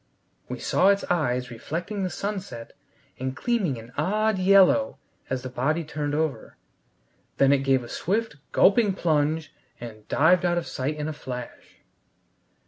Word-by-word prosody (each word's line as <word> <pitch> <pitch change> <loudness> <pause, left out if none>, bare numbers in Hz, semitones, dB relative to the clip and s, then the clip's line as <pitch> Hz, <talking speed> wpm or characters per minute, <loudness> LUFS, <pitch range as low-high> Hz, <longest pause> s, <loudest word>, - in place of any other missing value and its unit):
We - - -4
saw 185 - +2
its 200 0 +3
eyes 125 -7 0
reflecting 175 - -4
the 185 - -1
sunset, 190 - -5 0.5
and 130 +1 -3
gleaming 200 - 0
an 115 +2 -11
odd 210 +6 +1
yellow 195 +8 +4 0.3
as 130 -1 -2
the 130 - -5
body 150 +7 0
turned 145 -1 -3
over. 155 -2 -3 0.8
Then 135 0 +5
it 140 - +3
gave 135 -2 +2
a - - -9
swift, 215 - -2
gulping 205 0 +4
plunge, 155 -2 0 0.3
and 110 -3 -10
dived 175 +4 +4
out 175 -1 +1
of 170 - -1
sight 140 +4 -3
in 150 0 -4
a 155 - -3
flash. 125 -4 -8
155 Hz, 150 wpm, -25 LUFS, 130-190 Hz, 0.8 s, Then